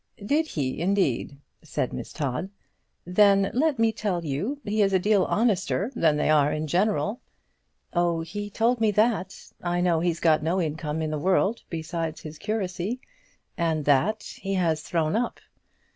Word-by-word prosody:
"Did 310 +7 +2
he, 140 - -3
indeed?" 175 -8 0 0.2
said - - -3
Miss - - -6
Todd; 140 +5 -3 0.6
"then 195 +2 +4
let 290 +2 +2
me 225 0 +3
tell 200 -6 -2
you 190 - -2
he 210 +1 0
is 195 -1 +3
a - - +6
deal 200 0 +3
honester 205 0 +1
than 155 -7 +3
they 150 - +1
are 150 -1 +4
in 155 +1 -2
general." 205 - 0 0.7
"Oh, 170 -1 +1
he 205 +5 -5
told 230 +3 +1
me 220 - +4
that. 210 -3 0
I 175 0 -1
know 175 -2 +2
he's 170 0 0
got 155 -2 +3
no 165 +5 0
income 155 -1 -2
in 155 - -2
the 155 - -2
world 190 +6 +2
besides 160 -1 -4
his 155 0 -9
curacy, 205 +1 -2 0.6
and 160 -3 0
that 170 +10 +2
he 195 0 -5
has 165 -4 +1
thrown 160 0 0
up." 235 +2 -1
180 Hz, 165 wpm, -26 LUFS, 160-210 Hz, 0.7 s, a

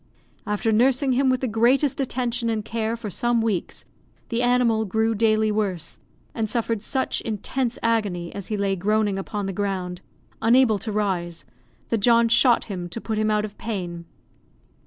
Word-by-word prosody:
After 210 +2 0
nursing 260 +4 +3
him 260 +1 +2
with 255 -1 +1
the 260 - 0
greatest 245 +6 +2
attention 245 -2 -1
and 215 -2 -2
care 225 0 -2
for 225 -3 -6
some 240 +4 +1
weeks, 220 -6 -2 0.4
the 230 0 0
animal 245 -3 +3
grew 220 +2 0
daily 215 0 +2
worse, 190 -6 -2 0.3
and 220 -1 -2
suffered 230 -1 -1
such 260 +4 -1
intense 230 +3 -2
agony, 205 -7 0
as 200 -2 -7
he 215 - -2
lay 200 -1 0
groaning 205 +1 +1
upon 205 +1 -4
the 195 - -3
ground, 185 -2 -3 0.4
unable 230 -2 +4
to 220 - -4
rise, 185 -5 -2 0.4
that 230 - +1
John 230 +2 +4
shot 235 +1 +5
him 180 -4 -6
to 200 - -5
put 220 -1 -3
him 215 0 +1
out 210 0 +1
of 210 -1 -11
pain. 175 -6 -5
220 Hz, 170 wpm, -24 LUFS, 200-235 Hz, 0.4 s, shot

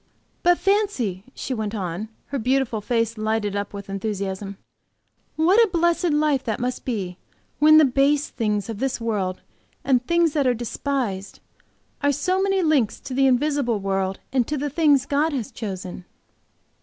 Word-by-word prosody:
"But 350 0 +4
fancy," 355 - 0
she 265 - -4
went 220 -2 -3
on, 190 +2 -4 0.2
her 275 - -2
beautiful 250 -2 0
face 230 0 -1
lighted 215 -2 -1
up 200 0 -3
with 200 -1 -8
enthusiasm, 195 -1 -4 0.8
"what 345 +7 +4
a 445 - +1
blessed 345 0 +2
life 295 -3 +2
that 220 -3 -2
must 250 +1 -3
be, 195 -7 -3 0.4
when 310 +1 +7
the 310 - +7
base 275 +2 +2
things 210 -4 -1
of 225 -3 -6
this 270 0 -1
world 200 -5 -2 0.4
and 255 -3 +2
things 340 +2 +2
that 285 -4 +2
are 250 - +3
despised, 235 -4 -3 0.6
are 285 0 +3
so 365 +7 0
many 390 -1 +1
links 290 -9 +2
to 265 - -7
the 270 +1 +3
invisible 260 -3 +1
world 195 -1 -1
and 255 -3 +2
to 300 - -2
the 290 +1 -2
things 290 -3 +3
God 290 +3 +1
has 265 -1 -3
chosen!" 185 -5 -6
250 Hz, 165 wpm, -23 LUFS, 205-295 Hz, 0.8 s, when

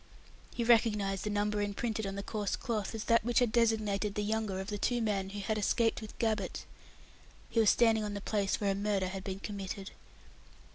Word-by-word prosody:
He 235 - 0
recognized 210 -5 +3
the - - -1
number 205 0 0
imprinted 210 +1 -2
on 195 - -4
the 200 - -4
coarse 210 -1 -2
cloth 220 -2 -3
as 220 - -3
that 230 -1 +3
which 240 +1 0
had 245 -3 +4
designated 215 -3 +1
the 210 - 0
younger 215 -2 -1
of 190 - -5
the 205 -1 -3
two 240 +4 +1
men 200 -4 0
who 205 +1 -5
had 215 +2 -1
escaped 225 +2 +1
with 215 - -10
Gabbett. 225 -1 -1 0.9
He 230 - +2
was 220 -2 +6
standing 225 -2 +4
on 205 -1 -3
the - - -3
place 200 -1 0
where 200 -2 +1
a - - +1
murder 200 -2 0
had 190 0 -6
been 195 0 -5
committed! 195 -1 -5
210 Hz, 205 wpm, -32 LUFS, 200-225 Hz, 0.9 s, was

